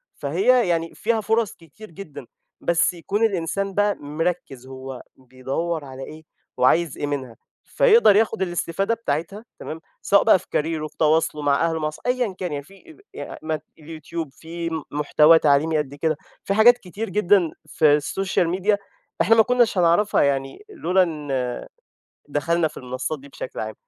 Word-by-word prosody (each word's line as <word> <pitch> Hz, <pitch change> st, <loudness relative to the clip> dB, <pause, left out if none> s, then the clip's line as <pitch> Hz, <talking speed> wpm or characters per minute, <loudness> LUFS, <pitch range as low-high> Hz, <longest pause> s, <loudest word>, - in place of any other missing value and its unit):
فهي 255 Hz, -, +2 dB
يعني 165 Hz, -1 st, -1 dB
فيها 225 Hz, 0 st, 0 dB
فرص 220 Hz, 0 st, +1 dB
كتير 170 Hz, +6 st, -15 dB
جدًا، 155 Hz, -6 st, -10 dB, 0.4 s
بس 170 Hz, +1 st, +2 dB
يكون 195 Hz, +5 st, -2 dB
الإنسان 195 Hz, 0 st, -2 dB
بقى 205 Hz, +1 st, +2 dB
مركِّز، 145 Hz, -3 st, -4 dB
هو 130 Hz, -1 st, -8 dB
بيدوّر 135 Hz, +5 st, -4 dB
على 135 Hz, 0 st, -8 dB
إيه 155 Hz, +3 st, -10 dB, 0.3 s
وعايز 145 Hz, +4 st, +2 dB
إيه 145 Hz, -, -2 dB
منها، 130 Hz, -5 st, -4 dB, 0.3 s
فيقدر 460 Hz, -, +5 dB
ياخد 220 Hz, 0 st, +2 dB
الاستفادة 190 Hz, +3 st, -1 dB
بتاعتها، 195 Hz, +2 st, -4 dB
تمام، 160 Hz, +1 st, -7 dB, 0.2 s
سواء 200 Hz, -, +4 dB
بقى -, -, +5 dB
في -, -, -18 dB
كاريره، 155 Hz, 0 st, -1 dB
في -, -, -23 dB
تواصله 155 Hz, -1 st, +2 dB
مع 145 Hz, +2 st, +2 dB
أهله، 160 Hz, -2 st, -2 dB
أصح 155 Hz, -, -8 dB
أيًا 245 Hz, -5 st, 0 dB
كان 180 Hz, -3 st, -3 dB
يعني 145 Hz, -, -4 dB
في 195 Hz, +7 st, -18 dB, 0.4 s
ي -, -, -6 dB, 0.2 s
مث 155 Hz, -1 st, -2 dB, 0.2 s
الYouTube، 160 Hz, 0 st, -6 dB
فيه 165 Hz, +3 st, -6 dB
م 160 Hz, -2 st, -3 dB
محتوى 150 Hz, +2 st, +5 dB
تعليمي 155 Hz, +2 st, +3 dB
قد 145 Hz, -2 st, -3 dB
كده، 155 Hz, +1 st, -1 dB, 0.3 s
في 195 Hz, -, 0 dB
حاجات 240 Hz, +3 st, +6 dB
كتير 205 Hz, +1 st, -6 dB
جدًا 190 Hz, -3 st, +3 dB, 0.2 s
في 150 Hz, -2 st, +4 dB
السوشيال 175 Hz, +3 st, -1 dB
ميديا 190 Hz, +4 st, +1 dB, 0.4 s
إحنا 225 Hz, -, +5 dB
ما 225 Hz, -, +6 dB
كناش 245 Hz, -4 st, +2 dB
هنعرفها، 175 Hz, +4 st, +3 dB
يعني 135 Hz, -, -2 dB
لولا 190 Hz, -, +2 dB
إن 140 Hz, -7 st, -3 dB, 0.7 s
دخَلنا 160 Hz, +3 st, 0 dB
في -, -, -18 dB
المنصات 130 Hz, +4 st, -4 dB
دي 140 Hz, -, -14 dB
بشكل 135 Hz, -, -7 dB
عام. 110 Hz, 0 st, -5 dB
165 Hz, 165 wpm, -23 LUFS, 145-195 Hz, 0.7 s, حاجات